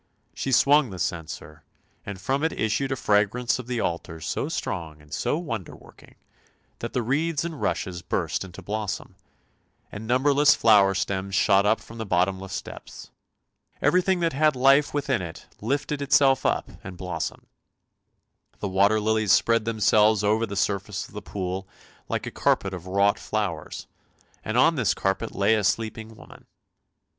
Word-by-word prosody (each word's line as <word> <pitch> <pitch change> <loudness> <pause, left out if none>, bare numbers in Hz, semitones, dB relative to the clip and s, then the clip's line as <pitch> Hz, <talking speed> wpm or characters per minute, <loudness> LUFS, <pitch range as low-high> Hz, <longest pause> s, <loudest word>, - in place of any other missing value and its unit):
She 135 - -3
swung 140 +1 +5
the 95 - -8
censer, 80 -3 -5 0.5
and 100 -2 -6
from 135 +9 -1
it 160 - +2
issued 115 +5 0
a - - +1
fragrance 110 +2 +1
of 125 - -8
the 125 -2 -2
altar 85 -3 -3
so 80 - -3
strong 80 -4 -4
and 75 -1 -15
so 110 - 0
wonder 115 - -5
working - - -18 0.6
that 115 - -5
the 125 - 0
reeds 150 +6 0
and 165 -4 -6
rushes 90 -2 -2
burst - - -2
into 90 -2 -11
blossom, 105 -1 -4 0.8
and 105 +1 -7
numberless 140 +4 +4
flower 100 -3 +5
stems 95 0 -2
shot 100 +1 +4
up 110 +2 +3
from 115 0 -12
the 110 - -3
bottomless 95 +1 -1
depths; - - -11 0.7
everything 180 0 +2
that 165 -3 +1
had 155 +1 +3
life 135 +3 +4
within 140 -6 -1
it 85 -2 -8 0.2
lifted 140 +5 -2
itself 135 -1 +4
up - - 0 0.2
and 90 -1 -8
blossomed. 90 -3 -5 1.1
The 100 - -4
water 100 +3 +3
lilies 110 -1 +1
spread 115 -2 +3
themselves 110 -1 +3
over 110 +2 +2
the 100 - -6
surface 100 0 -2
of - - -20
the 105 - -6
pool 95 -1 -4 0.4
like - - -2
a - - -5
carpet 95 -1 +1
of 90 0 -7
wrought 100 +2 +2
flowers, 100 -8 -3 0.6
and 110 +2 -2
on 160 +5 +4
this 120 -5 +1
carpet 95 +4 -2
lay 100 +3 +3
a 110 -2 +1
sleeping 110 +3 -2
woman. - - -15
110 Hz, 160 wpm, -25 LUFS, 95-130 Hz, 1.1 s, swung